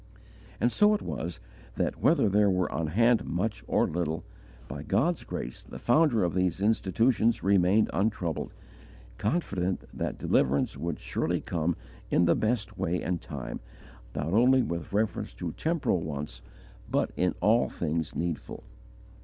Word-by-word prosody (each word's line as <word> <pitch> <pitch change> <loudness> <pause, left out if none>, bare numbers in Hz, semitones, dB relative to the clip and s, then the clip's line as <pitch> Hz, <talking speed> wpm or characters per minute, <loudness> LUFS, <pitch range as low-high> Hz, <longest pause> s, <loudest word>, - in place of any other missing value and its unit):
And 120 - +2
so 210 - +5
it 210 - -4
was 85 +2 -4 0.4
that, - - -1
whether - - +4
there 100 +1 +4
were 90 -1 +1
on 80 - -1
hand 115 +8 +3
much 100 +6 -2
or - - +3
little, 80 -1 -2 0.4
by - - -6
God's - - +1
grace 60 - -5
the - - -10
founder 125 - +3
of 85 - 0
these 90 -1 +1
institutions 110 +3 +2
remained 100 +2 +4
untroubled, 95 -5 -1 0.7
confident 95 - -1
that - - -3
deliverance 70 +2 +1
would 85 -2 -3
surely - - -1
come 85 0 -1 0.3
in 90 - +3
the 85 - +5
best 110 -3 -1
way 90 +2 -1
and 90 -1 -1
time, - - -6 0.6
not 75 +3 -2
only 125 +4 +5
with 85 -6 -4
reference 105 +2 -1
to 85 -2 -4
temporal 155 - 0
wants, 70 -6 -5 0.5
but - - +1
in 90 0 +1
all 115 +3 +3
things 80 -1 -2
needful. 85 0 -4
90 Hz, 145 wpm, -28 LUFS, 85-110 Hz, 0.7 s, so